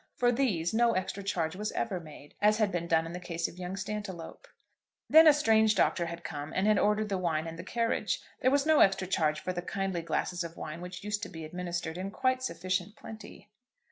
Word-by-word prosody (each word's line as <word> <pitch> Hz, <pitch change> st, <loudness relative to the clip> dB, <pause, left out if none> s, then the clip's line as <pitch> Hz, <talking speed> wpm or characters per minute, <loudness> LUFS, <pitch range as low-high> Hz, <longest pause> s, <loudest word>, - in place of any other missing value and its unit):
For 245 Hz, 0 st, +3 dB
these 215 Hz, -10 st, 0 dB
no 235 Hz, +1 st, +4 dB
extra 190 Hz, +2 st, -2 dB
charge 175 Hz, -4 st, -1 dB
was 210 Hz, +2 st, -3 dB
ever 195 Hz, -5 st, -2 dB
made, 150 Hz, -3 st, -13 dB
as 210 Hz, +1 st, +4 dB
had 215 Hz, -3 st, +2 dB
been 170 Hz, -1 st, -2 dB
done 165 Hz, -1 st, +3 dB
in 165 Hz, -, -7 dB
the 180 Hz, -, -5 dB
case 170 Hz, -2 st, -3 dB
of 180 Hz, -, -12 dB
young 180 Hz, +1 st, -4 dB
Stantiloup. 200 Hz, -, -6 dB, 0.6 s
Then 320 Hz, +1 st, +8 dB
a -, -, +11 dB
strange 220 Hz, -7 st, +4 dB
doctor 170 Hz, -5 st, +2 dB
had 170 Hz, +1 st, -7 dB
come, 145 Hz, -1 st, -5 dB
and 190 Hz, -, +1 dB
had 215 Hz, -1 st, +4 dB
ordered 210 Hz, +1 st, +2 dB
the 195 Hz, -2 st, -1 dB
wine 160 Hz, -3 st, 0 dB
and 165 Hz, 0 st, -7 dB
the -, -, -5 dB
carriage. 230 Hz, -3 st, -1 dB, 0.2 s
There 255 Hz, -, +3 dB
was 280 Hz, +1 st, +2 dB
no 315 Hz, -1 st, +5 dB
extra 195 Hz, -1 st, +4 dB
charge 155 Hz, -5 st, +1 dB
for 185 Hz, -, -3 dB
the 175 Hz, -, -3 dB
kindly 190 Hz, -1 st, -2 dB
glasses 175 Hz, +1 st, -2 dB
of 170 Hz, 0 st, -8 dB
wine 155 Hz, +2 st, -6 dB
which 180 Hz, +1 st, -8 dB
used 205 Hz, 0 st, -2 dB
to -, -, -5 dB
be 160 Hz, -1 st, -8 dB
administered 175 Hz, 0 st, -4 dB
in 190 Hz, +1 st, -3 dB
quite 255 Hz, +4 st, 0 dB
sufficient 185 Hz, -3 st, -2 dB
plenty. 210 Hz, -2 st, -11 dB
185 Hz, 225 wpm, -30 LUFS, 170-215 Hz, 0.6 s, a